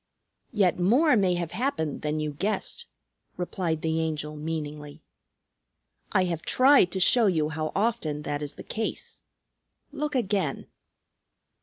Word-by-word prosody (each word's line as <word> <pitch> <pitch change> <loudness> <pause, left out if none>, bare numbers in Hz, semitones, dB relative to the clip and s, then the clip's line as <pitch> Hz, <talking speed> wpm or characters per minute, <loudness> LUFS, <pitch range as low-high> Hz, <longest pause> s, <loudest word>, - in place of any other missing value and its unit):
"Yet 195 -6 +2
more 250 - +4
may 190 -4 +3
have 170 -2 -3
happened 220 - -2
than 150 0 -1
you 150 -1 -2
guessed," 215 - -3 0.5
replied 175 -3 -2
the 160 0 0
Angel 155 -1 -3
meaningly. 150 -1 -6 1.1
"I 185 - +3
have 170 -3 -2
tried 255 - +5
to 190 - -1
show 225 +4 +5
you 155 -5 +1
how 155 0 -3
often 165 -9 0
that 145 0 -3
is 145 0 -6
the - - -9
case. 220 0 -5 0.7
Look 300 0 -3
again." 195 - 0
170 Hz, 135 wpm, -27 LUFS, 155-210 Hz, 1.1 s, tried